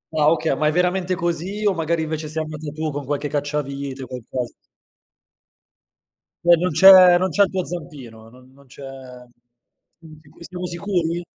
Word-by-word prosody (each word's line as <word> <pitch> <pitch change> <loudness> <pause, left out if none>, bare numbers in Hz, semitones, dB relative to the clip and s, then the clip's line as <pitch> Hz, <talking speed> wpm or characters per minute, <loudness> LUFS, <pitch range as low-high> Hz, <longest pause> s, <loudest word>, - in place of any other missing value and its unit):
Ah 150 0 +4
okay, 160 -3 0
ma 150 +2 0
è - - +2
veramente 180 +2 0
così 175 +5 -3
o 200 - +3
magari 165 -1 -1
invece 155 -1 -5
sei 160 +1 -3
andata 155 -1 -7
tu 155 0 -4
con 145 0 -5
qualche 145 +2 -3
cacciavite 140 -2 -4
o - - -9
qualcosa? 125 0 -6 1.9
Cioé, 175 - 0
non 180 0 -1
c'è 185 +1 +8
non 185 +1 0
c'è 200 +6 +3
il - - 0
tuo 185 -2 -3
zampino, 135 -10 -9
n 125 +2 -19
non 140 0 -21
c'è 140 +2 -13 1.2
siamo 155 -1 -17
si - - -13
siamo 180 0 -7
sicuri? 175 -1 -2
155 Hz, 170 wpm, -21 LUFS, 145-175 Hz, 1.9 s, c'è